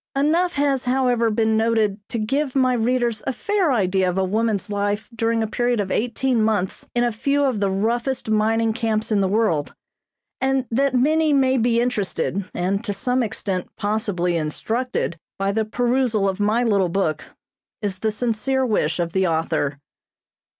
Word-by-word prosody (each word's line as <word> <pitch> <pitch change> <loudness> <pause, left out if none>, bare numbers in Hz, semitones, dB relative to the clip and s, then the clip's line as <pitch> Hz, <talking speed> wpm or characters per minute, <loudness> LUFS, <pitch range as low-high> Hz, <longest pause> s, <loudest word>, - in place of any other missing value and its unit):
Enough 330 +6 +2
has, 280 -3 +1
however, 250 -2 +2
been 220 0 +1
noted 220 -2 +1
to - - -3
give 270 +5 -1
my 255 -1 +3
readers 240 -1 0
a - - +2
fair 400 - 0
idea 190 -5 +2
of 180 - -3
a 190 - +2
woman's 210 +1 -1
life 205 +1 -1
during 230 0 0
a - - -1
period 240 +1 0
of 195 -2 -2
eighteen 245 +1 0
months 215 -4 -1
in 240 - +2
a 240 - +1
few 280 +6 0
of 260 -6 +1
the 200 -1 +1
roughest 235 +7 -1
mining 220 +1 +2
camps 220 -1 -1
in 205 -2 +3
the 190 - +2
world; 195 -8 0 0.7
and 265 -1 +1
that 270 +2 +1
many 305 +4 +3
may 265 -2 +3
be 235 -1 +2
interested, 205 -5 -1
and 195 +4 -1
to 205 - -2
some 250 +4 0
extent 195 -4 -3
possibly 205 -4 -1
instructed 170 +4 -2 0.2
by 195 0 0
the 220 +2 0
perusal 240 -2 +1
of 190 0 -2
my 215 +4 +2
little 200 -6 +2
book, 165 -4 -1 0.6
is 195 -2 -2
the 220 +1 0
sincere 245 +4 0
wish 175 -8 0
of 170 -1 -2
the 190 -1 +2
author. 160 -3 -1
220 Hz, 170 wpm, -22 LUFS, 200-250 Hz, 0.7 s, my